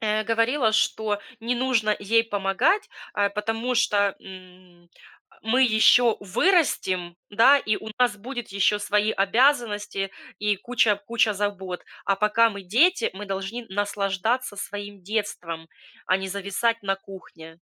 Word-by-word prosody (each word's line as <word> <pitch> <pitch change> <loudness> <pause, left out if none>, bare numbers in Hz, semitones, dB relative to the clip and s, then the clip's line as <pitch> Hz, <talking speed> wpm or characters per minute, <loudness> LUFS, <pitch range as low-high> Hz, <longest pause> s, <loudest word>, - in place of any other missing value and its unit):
э, 215 0 0
говорила, 230 +1 +1
что 215 -1 0 0.2
не 240 +2 -1
нужно 240 -4 +1
ей 225 +3 +2
помогать, 205 - 0 0.2
а 205 -1 +1
потому 225 +4 -2
что, 205 -4 +2
м, 185 -2 -15 0.5
мы 245 +4 +2
ещё 230 0 +5
вырастем, 190 - +1
да, 230 +7 +6
и 215 -5 -1
у 220 - -8
нас 240 -4 +2
будет 240 +2 -7
ещё 200 +1 +2
свои 205 +1 +1
обязанности 210 -3 +1 0.3
и 210 -1 0
куча 225 -1 +1
куча 230 -2 +2
забот, 190 -3 -4 0.2
а 195 - +2
пока 225 +3 +3
мы 200 -2 -8
дети, 285 - +2
мы 205 +2 -7
должны 195 +5 -5
наслаждаться 205 +3 -1
своим 205 -1 -7
детством, 180 -6 -4 0.4
а 185 - +3
не 190 - -5
зависать 200 +4 -1
на 195 -1 0
кухне. 170 -4 -13
210 Hz, 135 wpm, -24 LUFS, 195-230 Hz, 0.5 s, да